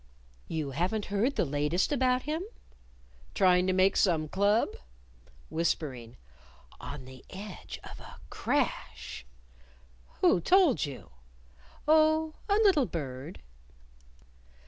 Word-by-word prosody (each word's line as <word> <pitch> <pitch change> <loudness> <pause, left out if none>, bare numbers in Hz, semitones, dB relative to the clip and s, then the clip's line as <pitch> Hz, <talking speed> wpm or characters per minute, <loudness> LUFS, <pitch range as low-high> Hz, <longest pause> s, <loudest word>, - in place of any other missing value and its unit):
"You 155 -4 -3
haven't 185 - -1
heard 235 +8 +1
the - - +1
latest 150 - 0
about 255 -2 +2
him?" 310 +3 -2 0.9
"Trying 180 -1 +4
to - - +3
make 185 +1 +3
some 160 -5 +2
Club?" 200 +6 +2 0.8
Whispering 140 -7 -2 0.6
"On 140 -2 -7
the 130 0 -13
edge 195 0 -8
of - - -10
a - - -12
crash." 60 - -2 0.9
"Who 175 - +4
told 355 - +4
you?" 135 -3 -10 0.8
"Oh, 315 0 +4 0.2
a 400 - +4
little 390 - +4
bird." 140 0 -6
185 Hz, 105 wpm, -29 LUFS, -, 0.9 s, Trying